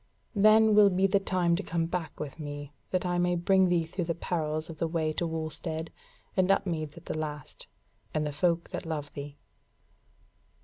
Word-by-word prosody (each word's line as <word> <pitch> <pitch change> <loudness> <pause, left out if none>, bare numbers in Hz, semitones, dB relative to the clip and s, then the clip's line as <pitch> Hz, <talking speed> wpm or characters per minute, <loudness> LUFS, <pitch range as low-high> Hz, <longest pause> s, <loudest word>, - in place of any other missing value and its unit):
Then 215 +1 +6
will 210 -1 +7
be 190 +1 +2
the 195 +1 +3
time 180 -3 +1
to 185 - -2
come 170 -3 -1
back 170 -1 -4
with 150 +1 -6
me, 145 -1 -6 0.2
that 185 0 0
I 175 0 +1
may 175 0 +2
bring 185 +2 +4
thee 175 -2 +3
through 170 +2 -3
the 170 0 -1
perils 155 -2 -2
of 160 -2 -9
the 165 - +1
way 160 -1 0
to 170 - -1
Wulstead, 160 0 -4 0.4
and 185 -2 +3
Upmeads 165 -6 0
at 170 - -12
the - - -3
last, 150 -3 -6 0.4
and 155 0 0
the 150 - -2
folk 170 +3 0
that - - -5
love 150 -2 -4
thee." 145 0 -7
165 Hz, 190 wpm, -29 LUFS, 155-180 Hz, 0.4 s, will